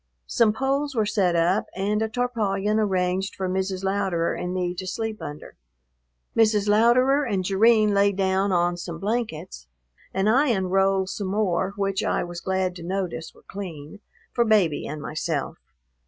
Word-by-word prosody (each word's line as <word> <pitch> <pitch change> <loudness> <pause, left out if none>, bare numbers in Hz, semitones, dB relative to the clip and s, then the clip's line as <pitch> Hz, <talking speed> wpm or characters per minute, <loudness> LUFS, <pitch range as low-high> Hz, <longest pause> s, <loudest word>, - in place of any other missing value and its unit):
Some 230 -4 +3
poles 275 +4 -1
were 220 -2 +2
set 195 -4 +1
up 170 +4 +2
and 205 +3 0
a 220 - 0
tarpaulin 215 -4 0
arranged 190 -2 0
for 190 - -3
Mrs. 190 0 -2
Louderer 190 -4 0
and 180 - -4
me 180 -1 -1
to 185 +1 -6
sleep 220 +2 -4
under. 150 +1 -8 0.8
Mrs. 215 -2 +3
Louderer 245 +7 +4
and 200 -7 -1
Jerrine 215 +2 +4
lay 200 0 +4
down 190 0 +1
on 175 -1 +1
some 170 -1 -6
blankets 180 - -4 0.4
and 195 +2 0
I 265 +7 +4
unrolled 190 -3 +1
some 200 -1 -4
more, 190 -1 0
which 195 0 -1
I - - 0
was 175 0 -7
glad 190 -1 -1
to 170 - -9
notice 180 -3 -4
were - - -21
clean, 175 -2 -8 0.3
for 235 - +3
Baby 205 -10 +2
and 150 0 -6
myself. 155 -2 -3
195 Hz, 160 wpm, -24 LUFS, 180-215 Hz, 0.8 s, Louderer